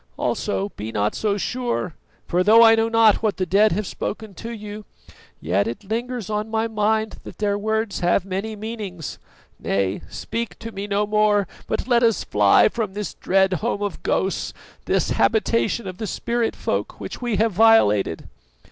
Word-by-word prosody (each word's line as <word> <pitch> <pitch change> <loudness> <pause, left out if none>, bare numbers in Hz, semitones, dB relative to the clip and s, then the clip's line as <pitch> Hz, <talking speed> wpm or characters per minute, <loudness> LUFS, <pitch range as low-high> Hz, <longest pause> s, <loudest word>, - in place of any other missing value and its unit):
Also, 95 +1 -1
be 110 +2 -7
not 105 -1 0
so 205 -2 0
sure, 240 -5 -2 0.3
for 180 +1 +1
though 225 +4 +7
I 225 -1 +8
know 225 0 +2
not 225 -2 +4
what 215 -2 0
the 185 - 0
dead 200 +5 +4
have 210 +3 -1
spoken 215 +2 -5
to 230 - -8
you, 210 -2 -7 0.6
yet 95 +3 0
it 115 - -5
lingers 235 +2 -3
on 215 +1 -2
my 225 +1 0
mind 220 0 0
that - - -10
their 205 -1 0
words 220 0 -1
have 175 +1 +2
many 195 +3 -3
meanings. 210 -7 -6 0.4
Nay, 95 0 -1
speak 230 0 -5
to 230 0 -7
me 200 0 -5
no 205 0 +1
more, 210 -2 +2 0.2
but - - -2
let 240 -2 +4
us 230 -3 +2
fly - - +4
from 215 -5 -3
this 210 -1 -4
dread 190 0 +2
home 205 - -1
of 205 -4 -4
ghosts, 190 0 -1 0.3
this - - +1
habitation 230 0 +1
of 185 0 -7
the 220 - -3
spirit 235 +3 -1
folk - - -3
which - - -7
we 240 -3 -1
have 220 +3 +2
violated." 180 - +4
210 Hz, 175 wpm, -22 LUFS, 190-225 Hz, 0.6 s, I